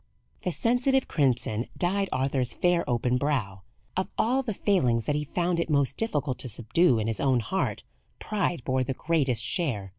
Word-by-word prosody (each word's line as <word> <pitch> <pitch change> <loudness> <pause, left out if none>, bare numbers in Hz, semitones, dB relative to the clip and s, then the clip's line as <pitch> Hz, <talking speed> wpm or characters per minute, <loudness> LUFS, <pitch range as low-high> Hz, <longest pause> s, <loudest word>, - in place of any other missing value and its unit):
The 180 - -1
sensitive 250 +7 +2
crimson 125 -5 0
dyed 195 +2 0
Arthur's 130 -1 +1
fair 175 -1 +2
open 125 +1 +1
brow. 120 -10 -1 0.3
Of 185 - -1
all 255 +4 +2
the 250 -4 -3
failings 125 - +1
that 150 - 0
he 150 0 -1
found 175 +3 -1
it 170 - -1
most 140 -3 +1
difficult 145 - -1
to 125 - -2
subdue 120 - +2
in 110 - -1
his 115 -1 -2
own 130 -3 +2
heart, 185 - -2 0.3
pride 195 - -2
bore 130 0 +1
the 130 +1 -3
greatest 135 -9 +1
share. 115 - -1
140 Hz, 175 wpm, -27 LUFS, 125-180 Hz, 0.3 s, sensitive